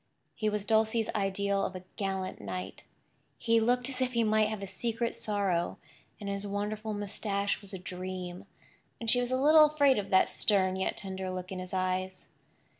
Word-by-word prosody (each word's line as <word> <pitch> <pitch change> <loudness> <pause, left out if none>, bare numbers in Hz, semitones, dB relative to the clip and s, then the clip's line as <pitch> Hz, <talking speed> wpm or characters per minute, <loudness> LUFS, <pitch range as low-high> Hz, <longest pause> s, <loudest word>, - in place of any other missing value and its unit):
He 215 -1 0
was 210 -1 -2
Dulcie's 220 0 +2
ideal 200 0 0
of 185 - -3
a 185 - -7
gallant 190 -2 -3
knight. 95 -1 -6 0.5
He 230 -1 +3
looked 245 +2 +2
as 260 -1 -4
if 255 0 0
he 235 -1 +3
might 215 0 +3
have 215 -2 -4
a - - -2
secret 230 +5 -2
sorrow, 195 -5 -1 0.4
and 205 - -6
his 200 0 -2
wonderful 210 +2 -3
moustache 200 0 -2
was 200 -2 -9
a 190 - -5
dream, 185 0 -6 0.5
and 230 -1 +3
she 245 - +5
was 245 - -1
a 255 0 +1
little 305 +2 +8
afraid 285 -5 +4
of 200 - -5
that 190 - +5
stern 190 -3 +2
yet 190 - -1
tender 190 -1 -4
look 185 0 -5
in 185 - -4
his 185 0 -6
eyes. 185 0 -2
200 Hz, 190 wpm, -30 LUFS, 185-225 Hz, 0.5 s, little